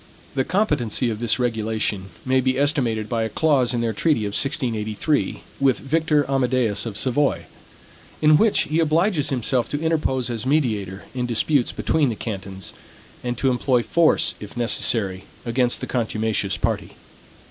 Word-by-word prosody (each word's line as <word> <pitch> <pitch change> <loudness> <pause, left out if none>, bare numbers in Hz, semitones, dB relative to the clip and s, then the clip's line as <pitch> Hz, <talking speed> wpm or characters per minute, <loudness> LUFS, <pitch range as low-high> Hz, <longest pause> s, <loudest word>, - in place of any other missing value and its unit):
The 135 - +1
competency 135 - 0
of 105 - -5
this 120 -2 +1
regulation 110 -5 -1 0.2
may 130 0 +3
be 130 0 0
estimated 125 -7 +1
by 115 -1 -1
a 110 - -1
clause 135 -2 +2
in 120 -2 -1
their 115 -1 0
treaty 150 -4 +1
of 100 - -3
1683, 120 0 0 0.2
with 135 -2 +3
Victor 150 0 +1
Amadeus 125 -5 +1
of 105 -3 -5
Savoy; 125 - +1 0.7
in 155 0 +5
which 215 +6 +4
he 155 +2 0
obliges 165 0 +2
himself 125 -2 0
to 145 - -2
interpose 150 -6 0
as 115 -2 -3
mediator 110 -9 0
in 125 -1 -2
disputes 120 +3 +1
between 150 -4 +1
the 115 - -3
cantons, 95 -3 -6 0.5
and 120 -1 -2
to 135 +2 +2
employ 125 -1 +1
force, 170 +4 +2
if 105 +3 -10
necessary, 105 -5 0 0.2
against 120 +1 +1
the - - -2
contumacious 110 -4 -1
party. - - -2
125 Hz, 155 wpm, -22 LUFS, 110-145 Hz, 0.7 s, in